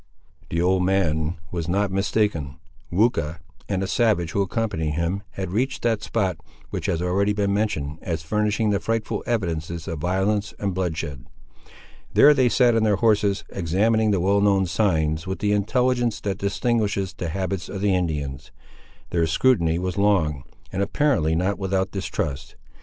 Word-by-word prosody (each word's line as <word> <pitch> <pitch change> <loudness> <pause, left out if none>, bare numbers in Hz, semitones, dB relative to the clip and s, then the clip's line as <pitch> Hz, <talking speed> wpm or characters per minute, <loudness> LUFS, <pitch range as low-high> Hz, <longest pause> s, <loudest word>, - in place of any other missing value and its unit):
The 85 - -1
old 90 0 +2
man 85 -4 +1 0.2
was 85 -2 -3
not 100 +2 +1
mistaken. 95 -8 0 0.4
Weucha, 85 -6 +1 0.3
and 95 -1 0
a - - -2
savage 105 -7 +1
who 100 - +1
accompanied 95 -6 -1
him, 85 +4 -1
had 95 -2 -4
reached 130 +7 -1
that 115 -3 +1
spot, 95 -6 -1 0.3
which - - -3
has 85 +1 0
already 100 +3 +1
been 100 -1 0
mentioned 85 -8 -1
as 80 -2 -3
furnishing 105 +4 +1
the 100 - +1
frightful 115 -1 -2
evidences 85 -7 -2
of 80 - -4
violence 95 +5 0
and 100 -2 -2
bloodshed. 80 -7 -3 0.9
There 150 - +8
they 130 -3 +3
sat 120 -1 +4
on 115 - +3
their 105 -2 +3
horses, 105 -2 +2
examining 105 +5 +1
the 100 -3 +2
well 100 +3 +2
known 100 -2 +3
signs, 80 -4 0
with 95 - -2
the 105 - 0
intelligence 120 +2 +1
that 100 -2 -3
distinguishes 100 -2 0
the 85 - -4
habits 95 0 -3
of 100 0 -5
Indians. 75 -8 -1 0.6
Their 85 -2 +2
scrutiny 85 -3 +2
was 90 +1 -2
long, 80 -9 +2 0.3
and 95 - -2
apparently 100 - +1
not 95 +3 0
without 95 0 0
distrust. 80 -7 -4
95 Hz, 160 wpm, -23 LUFS, 85-105 Hz, 0.9 s, There